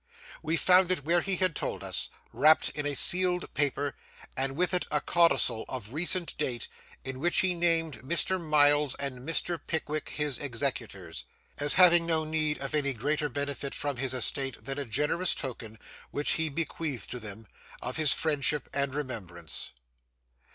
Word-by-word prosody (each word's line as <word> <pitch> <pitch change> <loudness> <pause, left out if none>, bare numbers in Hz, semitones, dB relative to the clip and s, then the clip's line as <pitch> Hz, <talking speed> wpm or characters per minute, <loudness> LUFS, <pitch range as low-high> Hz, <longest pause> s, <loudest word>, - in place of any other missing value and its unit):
We 160 +2 -1
found 185 +1 +4
it 180 -6 -1
where 170 +2 +3
he 195 +1 +1
had 185 -3 +1
told - - -3
us, - - -1 0.2
wrapped 155 +3 +4
in 145 -1 -4
a 145 - -2
sealed 180 +4 +3
paper, 145 0 0 0.4
and 135 +1 -1
with 180 +4 +1
it 180 - +3
a 150 - +1
codicil 170 -8 +2
of 125 -3 -5
recent 175 +2 +1
date, 125 -5 -2 0.4
in 130 -1 -6
which 175 +4 +3
he 185 -1 +1
named 165 -6 0
Mr. 170 +7 0
Miles 145 -2 +3
and 140 -2 -5
Mr. 165 +5 -2
Pickwick 155 -2 -2
his 150 -3 -2
executors,—as 115 - -3
having 175 -2 +6
no 160 -1 +1
need 155 -1 -1
of 135 +2 -5
any 140 -2 +2
greater 150 +5 -1
benefit 140 -1 -3
from 145 -3 -3
his 130 0 0
estate 130 -1 -1
than 135 +1 -3
a 140 - -3
generous 150 +10 0
token 115 -5 -6 0.3
(which 145 - -1
he 160 0 0
bequeathed 150 -5 -3
to 125 - -4
them) 110 0 -8 0.3
of 125 - -4
his 155 -2 +5
friendship 150 -2 +1
and 140 -1 0
remembrance. 95 - -4
145 Hz, 165 wpm, -28 LUFS, 130-165 Hz, 0.4 s, having